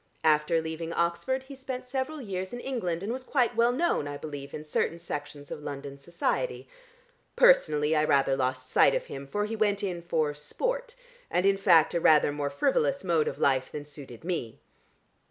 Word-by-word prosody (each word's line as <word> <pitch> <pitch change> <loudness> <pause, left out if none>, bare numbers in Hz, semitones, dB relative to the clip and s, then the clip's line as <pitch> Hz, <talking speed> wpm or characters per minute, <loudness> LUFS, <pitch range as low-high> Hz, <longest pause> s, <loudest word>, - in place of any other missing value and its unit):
After 155 +1 +3
leaving 160 +1 -4
Oxford 170 +11 0
he 275 +1 -10
spent 260 -1 -6
several 270 +4 -3
years 190 -5 -5
in 245 - -4
England, 195 -10 -3
and 220 +4 -2
was 260 0 -5
quite 250 -3 +1
well 235 +1 +4
known, 265 - 0
I 145 0 -5
believe, 145 -2 -7
in 150 - -6
certain 155 +2 -1
sections 145 -3 -7
of - - -6
London 140 -1 -7
Society. 175 - -2 0.7
Personally 155 - +4
I 150 - +3
rather 135 -2 +3
lost 130 -1 -2
sight 135 - +4
of - - -2
him, 140 0 -8
for 205 +8 -1
he 220 +1 -4
went 205 -1 +1
in 180 -3 -2
for 160 -3 0
sport - - -3 0.3
and, 180 - +1
in 195 0 +5
fact, 170 -5 +5
a 170 - +1
rather 150 -2 +5
more 145 -1 -2
frivolous 280 - +1
mode 165 -4 +2
of - - -3
life 130 -2 +1
than 145 -1 -6
suited 140 -5 -11
me. 165 -11 -3
170 Hz, 190 wpm, -28 LUFS, 145-235 Hz, 0.7 s, in